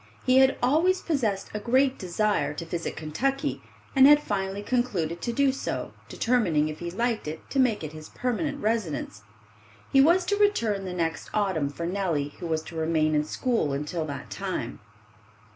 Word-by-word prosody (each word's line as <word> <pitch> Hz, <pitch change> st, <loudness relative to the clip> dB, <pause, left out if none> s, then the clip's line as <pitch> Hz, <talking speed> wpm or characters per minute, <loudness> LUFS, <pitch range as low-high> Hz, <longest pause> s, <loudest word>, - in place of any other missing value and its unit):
He 255 Hz, 0 st, +5 dB
had 265 Hz, 0 st, +4 dB
always 330 Hz, +9 st, +3 dB
possessed 230 Hz, -, -1 dB
a 210 Hz, -, -2 dB
great 260 Hz, +4 st, +2 dB
desire 190 Hz, -2 st, 0 dB
to 165 Hz, -, -5 dB
visit 165 Hz, 0 st, -4 dB
Kentucky, 275 Hz, -, -2 dB, 0.3 s
and 265 Hz, 0 st, +8 dB
had 295 Hz, 0 st, +8 dB
finally 200 Hz, -5 st, -3 dB
concluded 200 Hz, -9 st, -1 dB
to 235 Hz, -, -1 dB
do 275 Hz, +3 st, +3 dB
so, 270 Hz, -, -4 dB, 0.2 s
determining 180 Hz, -11 st, +1 dB
if 155 Hz, -, -7 dB
he 175 Hz, -, -4 dB
liked 230 Hz, +1 st, -1 dB
it 155 Hz, +1 st, -6 dB
to 275 Hz, -, 0 dB
make 240 Hz, -8 st, +2 dB
it 155 Hz, 0 st, -6 dB
his 155 Hz, 0 st, -10 dB
permanent 280 Hz, +4 st, -2 dB
residence. 210 Hz, -, -2 dB, 0.7 s
He 270 Hz, -, +7 dB
was 345 Hz, +5 st, +4 dB
to 405 Hz, +3 st, 0 dB
return 230 Hz, -, +1 dB
the 185 Hz, -, -4 dB
next 165 Hz, -2 st, -2 dB
autumn 190 Hz, -9 st, +1 dB
for 170 Hz, +4 st, -5 dB
Nellie, 170 Hz, -6 st, -1 dB
who 175 Hz, -, -4 dB
was 160 Hz, -1 st, -1 dB
to 165 Hz, -, -10 dB
remain 160 Hz, -1 st, +1 dB
in 150 Hz, 0 st, +2 dB
school 160 Hz, -, -1 dB
until 150 Hz, +4 st, -2 dB
that 140 Hz, -2 st, -7 dB
time. -, -, -4 dB
205 Hz, 175 wpm, -26 LUFS, 160-260 Hz, 0.7 s, and